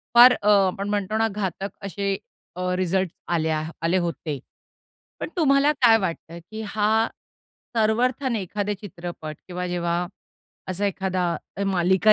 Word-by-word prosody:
फार 245 +1 +10
अ, 210 - +2 0.2
आपण 195 +2 -3
म्हणतो 205 +1 0
ना, 225 0 +3
घातक 195 -2 -3 0.2
असे 200 0 -1 0.4
अ, 180 - -5
रिझल्ट्स 185 -1 0 0.2
आले 160 -2 +1
हा 155 +1 -1
आले 175 +3 +3
होते. 160 -4 -3 0.8
पण - - -4
तुम्हाला 280 -2 +4
काय 230 -3 +7
वाटतं? 170 -4 -4
की 220 0 -5
हा 215 +2 +2 0.7
सर्वर्थाने 235 +2 +2
एखादा 205 +2 -2
चित्रपट 170 -5 -7
किंवा 180 0 -3
जेव्हा 175 0 0 0.6
असा 185 +2 0
एखादा 190 -2 -1 0.3
अ, 200 - -2
मालिका 190 +2 +4
195 Hz, 140 wpm, -24 LUFS, 175-215 Hz, 0.8 s, फार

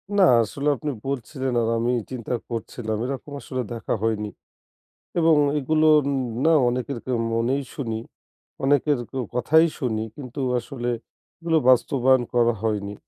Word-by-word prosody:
না, 200 - +5
আ - - +5
আসলে 140 +6 -4
আপনি 145 +4 -3 0.2
বলছিলেন 130 0 -3
আর 115 - 0
আমি 120 +2 +1
ই - - -5
চিন্তা 125 -2 -4 0.2
করছিলাম 115 -1 -4
এরকম 135 +2 -5
আসলে 130 -1 -4
দেখা 115 - -3
হয়নি, 105 -2 0 0.9
এবং 165 -1 +5 0.2
এগুলো 155 +3 +2
উম 140 0 -1 0.3
না 165 - +5 0.2
অনেকের 125 +1 -2
কের 130 -1 -1 0.2
মনেই 120 +5 +1
শুনি। 115 -5 -3 0.6
অনেকের 145 0 +3
কেউ 130 -1 -3
কথাই 160 +6 +4
শুনি 110 -6 -1
কিন্তু 140 -1 -7 0.2
আসলে 120 0 -4 0.5
এগুলো 165 -1 +2
বাস্তবায়ন 130 0 +4
করা 120 -1 +3
হয়নি 105 -2 -1
130 Hz, 145 wpm, -24 LUFS, 115-140 Hz, 0.9 s, না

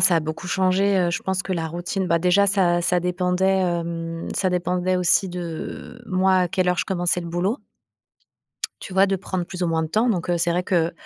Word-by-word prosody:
ça 180 -1 +6
a - - +2
beaucoup 160 +4 -5
changé, 190 +2 +2
heu, 175 -1 +2
je 175 - -3
pense 190 0 -1
que 190 - -4
la 165 -2 -2
routine 175 +3 -3
bah, 170 -1 +2
déjà 180 +4 +3
ça 180 -3 +2
ça 180 +1 +2
dépendait, 180 +2 +1
hem, 170 -1 -3
ça 190 - +1
dépendait 180 +1 0
aussi 180 +1 +2
de 180 +7 -7
moi, 190 0 +2
à 180 -1 +2
quelle 185 +1 0
heure 180 - -1
je - - 0
commençais 180 -2 0
le 170 - -7
boulot 180 - -1 1.2
tu 190 - -8
vois, 190 +1 +4
de 195 0 0
prendre 185 -1 -3
plus 180 +1 -6
ou - - +2
moins 165 -1 0
de 160 - -3
temps. 220 +8 +1
Donc 180 -6 -1
heu, 175 - +2
c'est 170 +1 +1
vrai 175 +1 +1
qu'une 170 -3 +1
180 Hz, 230 wpm, -23 LUFS, 175-190 Hz, 1.2 s, ça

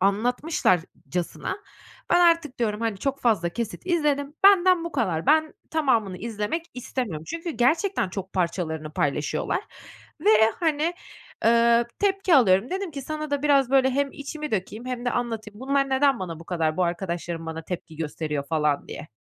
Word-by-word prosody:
anlatmışlarcasına 195 - 0 0.5
ben 350 - +5
artık 335 -5 +3
diyorum, 215 -3 -1
"hani, 225 -4 -1
çok 275 +4 -2
fazla 215 -8 +2
kesit 225 +4 -5
izledim, 295 -4 0
benden 370 -3 +6
bu 340 - -5
kadar. 185 - -1
Ben 315 +1 +3 0.2
tamamını 235 -12 +1
izlemek 225 +8 -3
istemiyorum" 230 -10 -4
çünkü 335 +1 -4
gerçekten 315 - +1
çok 190 0 -6
parçalarını 165 -4 -2
paylaşıyorlar 145 0 -1 0.6
ve, 215 - +4 0.3
hani, 320 +1 +1 0.5
ııı, 235 0 +5
tepki 390 -3 +2
alıyorum. 210 - +4
Dedim 380 -2 -3
ki 280 -2 -6
sana 305 +2 -5
da 285 0 -1
biraz, 275 -3 +3
böyle, 265 -1 +4
hem 280 +1 0
içimi 300 +1 -6
dökeyim 215 +4 -3
hem 250 -1 -4
de 245 - +1
anlatayım. 225 -3 -4
Bunlar 275 +1 +1
neden 270 -1 +3
bana 165 -3 -6
bu - - -11
kadar, 160 -3 -1
bu 180 - +2
arkadaşlarım 170 -1 -3
bana 160 0 -5
tepki 165 -2 -7
gösteriyor 150 -2 -3
falan, 150 -2 0
diye. - - -8
235 Hz, 155 wpm, -25 LUFS, 180-295 Hz, 0.6 s, benden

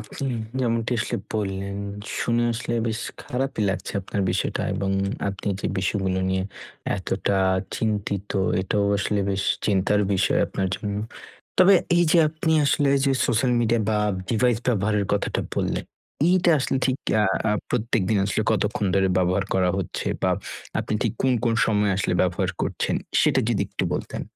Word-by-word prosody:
আপনি 110 +6 -6 0.3
যেমনটি 115 -1 0
আসলে - - -2 0.2
বললেন, 100 -1 -2 0.4
শুনে 120 0 +1
আসলে 120 +1 -3
বেশ 110 0 -2 0.2
খারাপই 130 -3 -2
লাগছে 95 0 -4
আপনার 100 +2 -3
বিষয়টা 95 - -1
এবং 95 0 -1 0.4
আপনি 100 +1 -7
যে, - - -2
বিষয়গুলো 95 -1 0
নিয়ে 95 0 0 0.5
এতটা 95 +1 -1 0.4
চিন্তিত, 100 -2 -2 0.3
এটাও 100 +2 0
আসলে 105 +1 0
বেশ 95 0 -1 0.2
চিন্তার 105 +1 +2
বিষয় 95 - +2
আপনার 95 -1 -2
জন্য। 100 -1 -4 0.6
তবে 185 +2 +7 0.2
এই 175 - +5
যে, - - +5
আপনি 160 +1 -1
আসলে 145 0 +2 0.2
যে, 140 - +3 0.2
social 125 +1 +2
media 115 0 +2
বা 110 - +2 0.3
device 120 0 +2
ব্যবহারের 105 -2 +1
কথাটা 100 - 0
বললেন, - - -1 0.4
এইটা 180 -1 +4
আসলে 135 - 0
ঠিক 130 -1 +1 0.3
আ - - +3 0.3
আ - - +3 0.2
প্রত্যেকদিন 110 -2 +1
আসলে 100 +2 0
কতক্ষণ 105 0 0
ধরে 95 -1 +3
ব্যবহার 90 +2 +2
করা 90 -1 +3
হচ্ছে? 95 - -4 0.2
বা - - +3 0.5
আপনি - - -3
ঠিক - - 0
কোন, 130 - +3
কোন 115 -1 +2
সময়ে 105 -2 +2
আসলে 95 -2 0
ব্যবহার 90 -2 0
করছেন? - - -1 0.3
সেটা - - +3
যদি - - +1
একটু - - -2
বলতেন। - - -4
105 Hz, 155 wpm, -24 LUFS, 95-120 Hz, 0.6 s, তবে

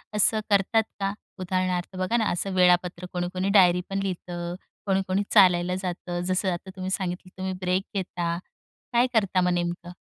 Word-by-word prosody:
असं 215 +1 +4
करतात 205 +3 +3 0.2
का? 195 0 -1 0.3
उदाहरणार्थ 185 0 -1
बघा 185 +6 +1
ना, 220 - +1
असं 190 +2 -2
वेळापत्रक 180 0 +2
कोणी-कोणी 185 +2 -2
डायरीपण 180 +2 +3
लिहितं. 175 -2 -4 0.3
कोणी-कोणी 195 0 +1
चालायला 180 -3 +5
जातं. 175 -1 -3
जसं 185 +1 +1
आता 175 +2 -7
तुम्ही 185 0 -4
सांगितलं, 185 -1 -3
तुम्ही 190 0 -3
ब्रेक 185 +1 +1
घेता. 175 -3 -2 0.6
काय 240 +2 +4
करता 200 -4 +2
मग 180 0 +2
नेमकं? 175 0 -3
185 Hz, 150 wpm, -26 LUFS, 175-195 Hz, 0.6 s, चालायला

